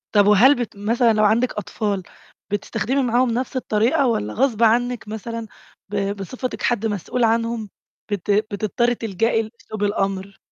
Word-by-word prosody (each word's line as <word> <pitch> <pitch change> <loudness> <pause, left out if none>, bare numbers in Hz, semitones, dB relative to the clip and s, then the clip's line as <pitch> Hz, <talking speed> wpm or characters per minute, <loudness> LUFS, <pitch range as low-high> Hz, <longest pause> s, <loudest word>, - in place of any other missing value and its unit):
طَب 205 0 +6
وهل 235 +8 +7
بت 240 -5 -4
مثلًا، 230 +3 +2
لو 215 0 +2
عندِك 230 +4 +2
أطفال 205 -1 -2 0.5
بتستخدمي 235 +6 -1
معاهُم 245 0 +2
نفس 255 +3 -2
الطريقة 245 +2 +2
والّا 105 - -1
غصبٍ 235 - +1
عنِك 240 0 +2
مثلًا 225 +1 -5 0.4
ب 200 -1 -1
بصفتِك 250 +6 -5
حَدّ 230 -2 +1
مسؤول 220 +4 -1
عنهم 230 -1 0 0.4
بت 205 0 -1
بتضطري 215 +3 +1
تلجأي 225 +1 0
لأسلوب 215 -1 -7
الأمر؟ 195 -1 -1
220 Hz, 145 wpm, -22 LUFS, 205-240 Hz, 0.5 s, وهل